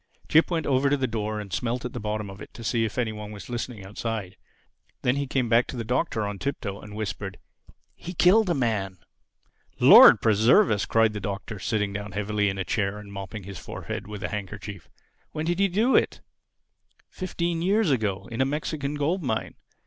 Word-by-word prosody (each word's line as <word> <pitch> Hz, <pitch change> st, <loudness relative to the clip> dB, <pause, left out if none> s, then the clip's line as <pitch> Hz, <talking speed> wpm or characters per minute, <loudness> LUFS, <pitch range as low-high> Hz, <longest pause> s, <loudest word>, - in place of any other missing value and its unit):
Jip 160 Hz, +1 st, +4 dB
went 165 Hz, -3 st, -1 dB
over 135 Hz, 0 st, +2 dB
to 145 Hz, -, +2 dB
the 135 Hz, -, 0 dB
door 110 Hz, -2 st, -3 dB
and 100 Hz, -3 st, -7 dB
smelt 120 Hz, +5 st, -2 dB
at 125 Hz, -, -5 dB
the -, -, -4 dB
bottom 105 Hz, 0 st, -3 dB
of 95 Hz, +1 st, -10 dB
it -, -, -10 dB
to 115 Hz, -, -9 dB
see 115 Hz, 0 st, +1 dB
if 110 Hz, -, -5 dB
any 120 Hz, -3 st, 0 dB
one 105 Hz, -1 st, -7 dB
were 105 Hz, -, -8 dB
listening 120 Hz, -4 st, -5 dB
outside. 105 Hz, -2 st, -4 dB, 0.7 s
Then 125 Hz, +1 st, +2 dB
he 140 Hz, 0 st, -2 dB
came 130 Hz, -2 st, 0 dB
back 115 Hz, +1 st, +3 dB
to 130 Hz, -, -6 dB
the 115 Hz, -, -2 dB
Doctor 120 Hz, -2 st, -1 dB
on 100 Hz, -1 st, -5 dB
tiptoe 105 Hz, -8 st, -4 dB
and 105 Hz, 0 st, -10 dB
whispered, 100 Hz, -2 st, -4 dB, 0.6 s
"He 180 Hz, +1 st, -8 dB
killed 190 Hz, +5 st, +5 dB
a 170 Hz, -, +2 dB
man!" 105 Hz, -7 st, -1 dB, 0.8 s
"Lord -, -, +9 dB
preserve 115 Hz, -, +4 dB
us!" 105 Hz, -2 st, 0 dB
cried 115 Hz, -1 st, +3 dB
the 105 Hz, -, -4 dB
Doctor, 100 Hz, +1 st, -5 dB
sitting 105 Hz, 0 st, -1 dB
down 100 Hz, -1 st, -5 dB
heavily 105 Hz, 0 st, 0 dB
in 95 Hz, -, -4 dB
a 95 Hz, -, -2 dB
chair 100 Hz, 0 st, -1 dB
and 105 Hz, -1 st, -10 dB
mopping 100 Hz, +1 st, -7 dB
his 95 Hz, -3 st, -8 dB
forehead -, -, -6 dB
with 105 Hz, -2 st, -7 dB
a -, -, -2 dB
handkerchief. 100 Hz, -2 st, -7 dB, 0.4 s
"When 155 Hz, -, -3 dB
did 175 Hz, +2 st, 0 dB
he 200 Hz, -, +4 dB
do 215 Hz, +8 st, +2 dB
it?" -, -, +2 dB, 0.9 s
"Fifteen 170 Hz, -3 st, -2 dB
years 195 Hz, 0 st, +2 dB
ago—in 110 Hz, 0 st, -1 dB
a -, -, +6 dB
Mexican 145 Hz, 0 st, -3 dB
gold 155 Hz, +6 st, 0 dB
mine. 120 Hz, -7 st, -2 dB
110 Hz, 200 wpm, -26 LUFS, 105-140 Hz, 0.9 s, Lord